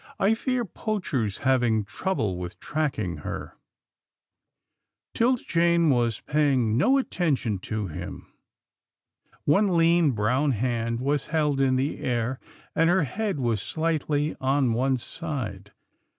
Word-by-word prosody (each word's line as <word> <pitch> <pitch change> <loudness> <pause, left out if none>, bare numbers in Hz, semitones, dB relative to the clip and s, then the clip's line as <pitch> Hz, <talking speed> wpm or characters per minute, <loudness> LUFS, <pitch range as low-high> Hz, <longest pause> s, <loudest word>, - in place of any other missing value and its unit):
I 200 +3 +4
fear 245 +1 -1
Poacher's 165 - -2
having 120 -5 +3
trouble 110 - -2
with 90 0 -7
tracking 130 - -2
her." 75 - -6 1.6
'Tilda 245 +2 +2
Jane 170 -2 +3
was 120 -4 +1
paying 135 -7 +2
no 260 - +4
attention 145 - 0
to 105 +2 -3
him. 80 -5 -7 1.2
One 190 +3 +3
lean, 165 -3 +4
brown 125 +7 +1
hand 115 0 -1
was 140 +1 0
held 150 -3 +1
in 130 -1 +3
the 135 +3 -1
air, 125 +1 -1 0.4
and 165 +1 +4
her 180 0 +3
head 195 - -2
was 115 -5 0
slightly 155 -2 -1
on 130 -2 +2
one 130 +3 +1
side. 120 - -5
135 Hz, 120 wpm, -26 LUFS, 115-165 Hz, 1.6 s, I